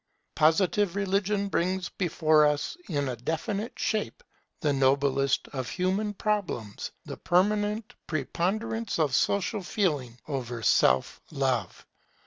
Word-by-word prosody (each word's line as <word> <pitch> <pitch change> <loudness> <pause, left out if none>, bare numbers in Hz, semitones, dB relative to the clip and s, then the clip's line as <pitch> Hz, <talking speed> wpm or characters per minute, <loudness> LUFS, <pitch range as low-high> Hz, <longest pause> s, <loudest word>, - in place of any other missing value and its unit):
Positive 175 +4 +3
religion 200 +1 0
brings 185 0 -1
before 155 -4 +3
us 150 - -1
in 145 -4 0
a 125 - -2
definite 165 - -3
shape 220 - -2 0.4
the 145 -2 +2
noblest 135 0 +2
of 130 -3 -4
human 195 +3 -1
problems, 190 - -2 0.2
the - - -7
permanent 210 +5 +1
preponderance 200 - -2
of 150 -5 +1
Social 200 - +1
feeling 150 - -1
over 125 -5 -4
Self 65 -9 +3
love. 130 - -1
170 Hz, 115 wpm, -28 LUFS, 135-205 Hz, 0.4 s, Positive